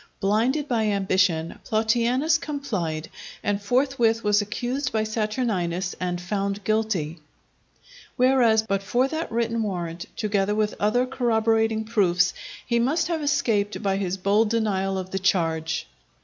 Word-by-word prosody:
Blinded 235 +9 +1
by 225 -4 +1
ambition, 185 -5 +1
Plautianus 240 +8 +2
complied, 205 - -3 0.4
and 205 0 0
forthwith 240 0 +1
was 210 0 +3
accused 250 +6 -3
by 220 -1 +1
Saturninus 210 -5 -1
and 180 -1 -2
found 200 +2 -3
guilty; 200 -8 -1 1.0
whereas, 245 -4 +4
but 195 -3 -1
for 245 +6 +1
that 320 +3 -4
written 230 0 0
warrant, 175 -5 -4
together 205 -1 0
with 215 0 0
other 230 +5 +2
corroborating 225 -3 +1
proofs, 185 -5 +2 0.3
he 235 -1 +1
must 295 +8 +1
have 330 -2 -1
escaped 225 -9 0
by 195 -1 +1
his 190 -1 -2
bold 205 +3 +2
denial 195 -4 0
of 185 0 -5
the 195 - -1
charge. 165 -4 0
215 Hz, 135 wpm, -24 LUFS, 195-235 Hz, 1.0 s, whereas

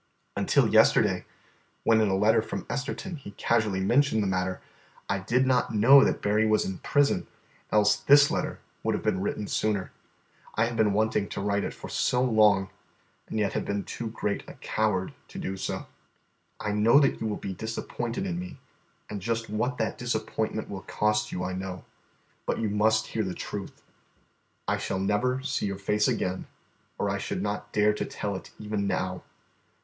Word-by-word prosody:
Until - - +3
yesterday, - - +4 0.6
when 110 -1 +4
in 110 - +3
a 95 - +1
letter 105 +3 +4
from 100 -3 -5
Esterton 145 +5 -4
he 100 -7 -10
casually 110 -5 +1
mentioned 120 +2 +3
the - - 0
matter, 95 0 -1 0.5
I 100 - 0
did 120 +7 +2
not 125 -3 +1
know 135 +6 +8
that - - 0
Berry 105 +2 +3
was 110 0 +3
in 95 -1 -4
prison, 145 0 +2 0.4
else 105 0 +4
this 140 +6 +6
letter - - -2 0.2
would - - 0
have - - -4
been 95 - +1
written 100 +1 -2
sooner. 100 -2 -1 0.6
I 115 - +3
have 120 0 -3
been 110 -3 +3
wanting 105 -1 +1
to - - -4
write 100 0 0
it - - -4
for - - -9
so 125 0 +1
long, 105 -5 +4 0.6
and - - -4
yet 105 -2 +1
have - - -1
been 100 0 -2
too 115 - -5
great 105 -2 -2
a - - -10
coward 105 -4 -1
to - - -11
do 95 - -3
so. 95 - -4 0.7
"I 105 - -2
know 110 +6 +5
that 140 - +2
you 110 - -1
will 105 - -2
be 95 - -5
disappointed 115 - -4
in 175 -2 -2
me, 180 -5 -7 0.5
and 105 -2 -6
just 115 +1 -2
what 125 +4 -1
that 110 - -2
disappointment 110 -2 -2
will 95 -1 -6
cost 105 +1 0
you 90 - -3
I 90 +1 -2
know; 95 -1 -5 0.6
but - - 0
you 110 -2 -1
must 110 +1 +3
hear 110 - -2
the 95 -2 -4
truth. 100 -2 -7 0.8
I - - +1
shall - - -2
never 105 +7 0
see 140 -6 -1
your 100 -1 -3
face 105 +2 +1
again, 90 0 -1 0.5
or - - 0
I - - -1
should - - -3
not - - -3
dare 105 0 +3
to - - -3
tell 100 -1 -4
it 95 - -8
even 105 -1 -2
now. 90 -1 -2
105 Hz, 185 wpm, -27 LUFS, 100-115 Hz, 0.8 s, know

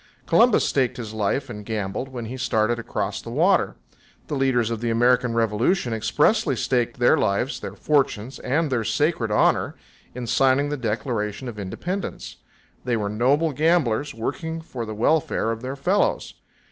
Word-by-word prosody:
Columbus 235 -1 +4
staked 130 -3 0
his 110 -3 -6
life 110 +6 -1
and 105 -4 -8
gambled, 105 +2 -3
when 120 -3 -6
he 120 +4 -6
started 120 -2 0
across 105 -3 -3
the 115 - -9
water. 170 +9 +2 0.5
The - - -3
leaders 125 -4 +1
of 115 -1 -3
the 120 - -1
American 120 +1 +2
Revolution 115 - +1
expressly 145 - +2
staked 125 +1 0
their 120 0 +4
lives, 110 +8 0
their - - -7
fortunes 135 -5 0
and 150 +3 0
their 120 -3 +1
"sacred 145 -2 0
honor" 105 - +2 0.4
in 125 -1 -4
signing 135 +4 +2
the 145 - -1
Declaration 110 0 -3
of 110 -3 -7
Independence. 175 - -5 0.5
They 120 -2 0
were 105 -2 -2
noble 135 +9 +2
gamblers, 145 -3 +1
working 145 +8 -4
for 125 -8 -6
the 110 - -5
welfare 120 -1 +1
of 115 0 -5
their 130 +2 -4
fellows. 180 +9 0
125 Hz, 160 wpm, -23 LUFS, 110-145 Hz, 0.5 s, Columbus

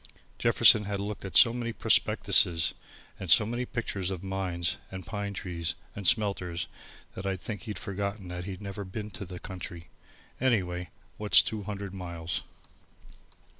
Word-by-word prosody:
Jefferson 105 -1 +6
had 100 -1 -2
looked 105 +1 -4
at 90 -3 +1
so 115 - +8
many 120 -1 -2
prospectuses 100 -6 +3 0.5
and 95 - -6
so 105 +6 +7
many 120 +3 -2
pictures 100 -6 -2
of 95 -1 -4
mines 95 -3 -1
and 95 -2 -7
pine 100 +1 -3
trees 85 -4 -3 0.2
and 100 -3 -1
smelters, 95 -5 +1 0.5
that 95 - -5
I 95 -1 0
think 105 +3 -6
he'd 105 -3 -4
forgotten 100 0 -4
that 90 0 -5
he'd 95 0 -6
never 100 +1 -5
been 105 +3 -6
in 100 - -4
the 90 0 -7
country. 85 -3 -8 0.5
Anyway, 90 -9 +1 0.3
what's 105 -1 +7
two 110 -2 -3
hundred 100 -1 -5
miles! 85 -3 -3
95 Hz, 155 wpm, -29 LUFS, 90-105 Hz, 0.5 s, so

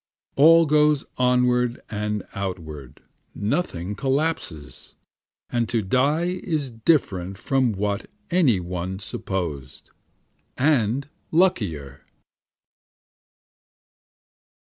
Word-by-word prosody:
All 165 +3 +7
goes 150 -1 +3
onward 125 -1 +2
and 105 -1 -3
outward, 80 -9 -6 0.3
nothing 105 - -2
collapses, 135 - -2 0.6
And 120 -2 0
to 115 -3 0
die 150 - +1
is 150 -7 -2
different 100 - 0
from 130 0 +1
what 100 0 -2 0.2
any 150 - +4
one 90 +1 -4
supposed, 90 -8 -5 0.7
and 130 -2 +2 0.2
luckier. 95 - 0
115 Hz, 80 wpm, -24 LUFS, 95-145 Hz, 0.7 s, All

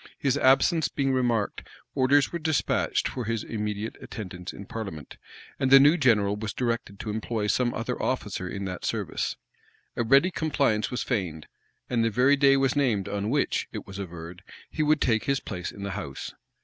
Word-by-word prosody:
His 135 -2 +1
absence 145 +4 +4
being 135 -2 0
remarked 120 -5 0 0.3
orders 135 0 +3
were 170 - -2
despatched 155 -2 0
for 125 -3 -4
his 115 0 -2
immediate 105 0 -4
attendance 90 -4 -7
in 100 - -10
parliament; 95 - -7 0.4
and 135 -1 +1
the 135 +1 +9
new 145 +4 +6
general 110 - +3
was 105 -1 -4
directed 115 -5 -2
to 110 - -4
employ 110 0 -2
some 120 +3 +1
other 120 +2 -3
officer 100 -7 -2
in 100 0 -4
that 90 -2 -5
service. - - -2 0.6
A 120 - 0
ready 135 +10 +5
compliance 140 -10 +1
was 125 - -2
feigned; 90 - -2 0.4
and 120 -2 +1
the 115 - +2
very 125 +5 +4
day 135 -1 +5
was 135 0 +2
named 115 -9 +1
on 100 +1 -2
which, 140 +2 0
it - - -6
was 95 0 -9
averred, 85 -1 -8 0.3
he 155 - -2
would 155 0 +3
take 110 -3 +2
his 140 0 +1
place 90 -7 -5
in 100 - -9
the 100 - -3
house. 95 -9 -6
115 Hz, 185 wpm, -27 LUFS, 100-135 Hz, 0.6 s, the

